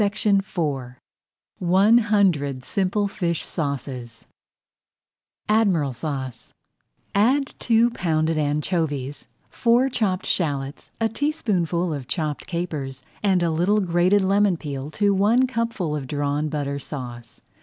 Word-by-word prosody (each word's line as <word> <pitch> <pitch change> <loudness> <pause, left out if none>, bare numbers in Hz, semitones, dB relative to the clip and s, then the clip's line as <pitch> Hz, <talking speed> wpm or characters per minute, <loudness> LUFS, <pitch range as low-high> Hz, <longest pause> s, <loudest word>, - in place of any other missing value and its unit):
[Page 205 +1 0
13] 160 - 0 0.6
ONE 190 +6 +5
HUNDRED 180 - +1
SIMPLE 200 +1 0
FISH 170 -4 -2
SAUCES 130 -6 -4 1.2
ADMIRAL 190 - +2
SAUCE 130 -3 -5 0.6
Add 260 +7 +2
two 230 +1 +3
pounded 160 -5 0
anchovies, 145 -2 -1 0.2
four 245 +3 +3
chopped 195 -7 -1
shallots, 140 -5 -2
a 225 - +2
teaspoonful 190 - -1
of 135 -4 -6
chopped 155 -4 -3
capers, 150 -7 -4 0.2
and 190 -4 +2
a 170 - +1
little 180 +7 +2
grated 185 +2 +3
lemon 195 -1 +3
peel 140 -2 -5
to 205 +5 +2
one 215 +7 +4
cupful 230 -10 -2
of 140 -3 -4
Drawn 145 +2 -1
Butter 140 -2 -2
Sauce. 120 -5 -8
170 Hz, 115 wpm, -23 LUFS, 145-205 Hz, 1.2 s, ONE